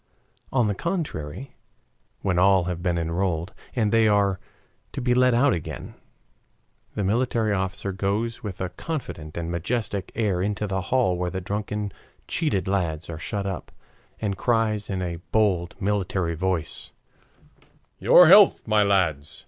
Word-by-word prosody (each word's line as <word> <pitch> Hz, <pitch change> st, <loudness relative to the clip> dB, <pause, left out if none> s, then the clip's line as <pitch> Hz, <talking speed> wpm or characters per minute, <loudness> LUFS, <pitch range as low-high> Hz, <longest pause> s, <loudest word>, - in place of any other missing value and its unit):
On 125 Hz, -3 st, +2 dB
the 105 Hz, -, 0 dB
contrary, 135 Hz, -, -4 dB, 0.7 s
when 90 Hz, -2 st, +1 dB
all 95 Hz, 0 st, +5 dB
have 90 Hz, -1 st, -3 dB
been 90 Hz, -2 st, 0 dB
enrolled, 85 Hz, +2 st, -1 dB, 0.2 s
and 110 Hz, -4 st, +1 dB
they 115 Hz, -1 st, +4 dB
are 100 Hz, -2 st, +2 dB, 0.5 s
to -, -, -4 dB
be 125 Hz, 0 st, +1 dB
let 125 Hz, -1 st, +4 dB
out 135 Hz, +2 st, +4 dB
again, 80 Hz, -4 st, -6 dB, 1.0 s
the 105 Hz, -, -1 dB
military 110 Hz, +1 st, +1 dB
officer 95 Hz, +1 st, -2 dB
goes 105 Hz, +4 st, -2 dB
with 100 Hz, -4 st, -6 dB
a 95 Hz, -, -1 dB
confident 90 Hz, -, -6 dB
and 85 Hz, 0 st, -3 dB
majestic 100 Hz, +3 st, -2 dB
air 100 Hz, -6 st, 0 dB
into 105 Hz, +2 st, -1 dB
the 95 Hz, -2 st, -2 dB
hall 120 Hz, -9 st, +2 dB
where 90 Hz, 0 st, -1 dB
the 95 Hz, +1 st, -4 dB
drunken, 105 Hz, +2 st, -3 dB, 0.4 s
cheated 150 Hz, -, -1 dB
lads 85 Hz, -4 st, -1 dB
are 80 Hz, -, -6 dB
shut 100 Hz, +3 st, -3 dB
up, 95 Hz, -3 st, -5 dB, 0.5 s
and 100 Hz, -3 st, -2 dB
cries 110 Hz, -3 st, +1 dB
in 95 Hz, -2 st, -2 dB
a 85 Hz, -1 st, -3 dB
bold, 95 Hz, -6 st, +1 dB
military 95 Hz, -3 st, -1 dB
voice: 85 Hz, -2 st, -2 dB, 1.1 s
"Your 180 Hz, -, +7 dB
health, 195 Hz, -, +7 dB
my 110 Hz, -1 st, +4 dB
lads! 85 Hz, -8 st, +1 dB
100 Hz, 150 wpm, -25 LUFS, 90-110 Hz, 1.1 s, Your